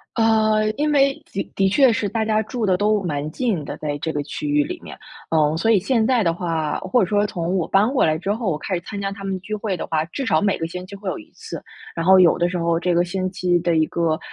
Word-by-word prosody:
呃， 220 -1 +3
因 300 +3 0
为 275 -1 +4 0.2
的 195 - -2
的 195 0 +2
确 255 +3 +5
是 205 -3 -1
大 225 -1 -1
家 215 0 +2
住 220 +1 -3
得 185 - +3
都 210 +2 +2
蛮 150 -3 -2
近 220 - -1
的， - - -6
在 145 -1 -3
这 160 - -2
个 145 - -2
区 300 - -5
域 295 0 +3
里 355 +3 -6
面， - - -10 0.3
嗯， 155 -1 +2
所 195 +7 0
以 205 - +5
现 225 +2 +1
在 245 -4 +2
的 165 -1 +2
话， 165 -3 -2
或 190 +6 +1
者 - - +3
说 205 +1 +2
从 175 +1 -2
我 175 - 0
搬 200 +3 +3
过 260 - +3
来 155 0 +1
之 195 +5 -1
后， 220 -5 -2
我 150 - -1
开 185 +5 -5
始 175 - -3
参 200 +3 -7
加 195 0 -2
他 200 0 -9
们 190 -1 -3
聚 215 +3 -5
会 200 -3 -3
的 - - -4
话， 155 -1 0
至 265 - -5
少 155 -9 +2
每 200 -1 +1
个 165 - -3
星 180 +2 -7
期 200 - -9
会 200 0 -9
有 - - -3
1 - - -14
次。 - - -8 0.3
然 165 - -2
后 190 0 +7
有 175 -2 +5
的 175 0 +2
时 180 - -3
候 170 -1 +1
这 175 0 0
个 175 +1 +2
星 185 +1 -2
期 180 -2 +1
的 170 -1 +1
一 155 - +3
个， 165 0 -1
190 Hz, 300 characters per minute, -21 LUFS, 170-215 Hz, 0.3 s, 后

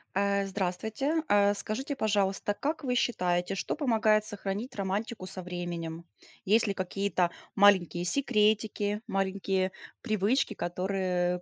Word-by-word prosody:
А, 200 0 +2
здравствуйте. 215 - -1
А 205 0 +4
скажите, 265 +8 -2
пожалуйста, 205 -3 +1
как 300 +9 -3
вы 255 -2 0
считаете, 180 -6 0
что - - -2
помогает 220 -7 +3
сохранить 205 +4 -4
романтику 200 +1 -3
со 185 0 -6
временем? 170 -2 -5 0.4
Есть 220 +3 +4
ли 200 - -1
какие-то 185 -1 0 0.2
маленькие 185 -4 +4
секретики, 215 -3 +1
маленькие 190 -1 0 0.3
привычки, 215 +3 +1
которые 180 0 -1
200 Hz, 115 wpm, -29 LUFS, 185-215 Hz, 0.4 s, А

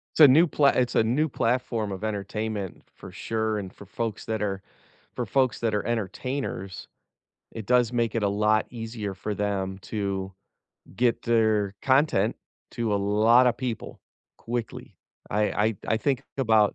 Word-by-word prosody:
It's - - -5
a 150 - +11
new 155 +7 +6
pla 145 -2 +2
it's 125 -1 +1
a - - +5
new 145 +7 +1
platform 115 -4 -1
of 95 - -7
entertainment 105 -1 -3
for - - -11
sure, 110 -1 -2
and 95 -3 -6
for 100 - -13
folks 115 +2 -4
that 110 -1 -2
are 95 -2 -2 0.5
for - - -2
folks 130 -2 +1
that 115 -2 0
are 105 - -1
entertainers, 115 -3 -3 0.6
it 110 -3 -8
does 125 -1 +3
make 115 -2 0
it 110 - 0
a - - +3
lot 105 +1 +2
easier 115 -4 -5
for 100 +2 -4
them 95 -2 -2
to 100 -2 -3 0.6
get 120 +1 +1
their 110 -4 +2
content 130 -6 +2 0.4
to 115 -3 -1
a - - +3
lotta 110 +5 +4
people 120 -2 -5 0.4
quickly. 120 -1 -5 0.4
I 105 +1 +1 0.3
I 110 - -4
I 110 - +3
think 135 +1 0
about, 110 -6 +3
110 Hz, 160 wpm, -26 LUFS, 105-120 Hz, 0.6 s, a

